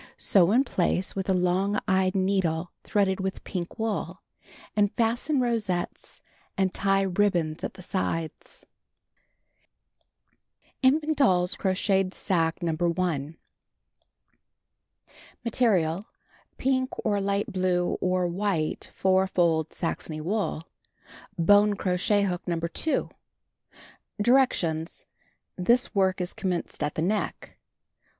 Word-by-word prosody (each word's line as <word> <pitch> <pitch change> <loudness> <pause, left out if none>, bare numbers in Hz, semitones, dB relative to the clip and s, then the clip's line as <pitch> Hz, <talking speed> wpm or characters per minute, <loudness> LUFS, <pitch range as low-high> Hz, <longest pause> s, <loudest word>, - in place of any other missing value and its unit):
Sew 185 -3 +4
in 250 +5 +4
place 185 -5 -1
with 195 -1 -3
a - - +4
long 185 +3 +1
eyed 190 -1 +2
needle 185 -3 0
threaded 195 -2 +1
with 190 0 -3
pink 175 -3 -5
wool, 220 -2 -3 0.5
and 205 -1 +3
fasten 240 +5 0
rosettes 220 -8 -2 0.3
and 190 -1 +1
tie 195 0 +2
ribbons 180 -5 0
at - - -4
the 185 - -11
sides. 165 -4 -4 2.2
INFANl^ 300 +4 +3
DOLL'S 180 -11 +3
CROCHETED 190 0 0
SACQUE 165 -1 0
NO. 165 - +1
1* 170 -3 -1 2.1
Material: 200 -6 +1 0.5
Pink, 260 -1 +1 0.2
or 205 -2 +1
light 200 0 -1
blue, 180 -1 0
or 185 0 +1
white, 175 -3 -1
four 190 0 +3
fold 165 -4 +1
Saxony 165 -2 -3
wool, 185 -1 -2 0.7
hook, 205 +4 +4 0.6
No. 170 -1 0
2. 170 - 0 1.1
Directions: 205 -9 +1 0.6
Tills 245 +6 +3
work 190 -2 +2
is 180 0 -3
commenced 180 -2 -3
at 150 - -1
the 160 - -1
neck. 210 +5 -2
190 Hz, 105 wpm, -26 LUFS, 175-205 Hz, 2.2 s, Sew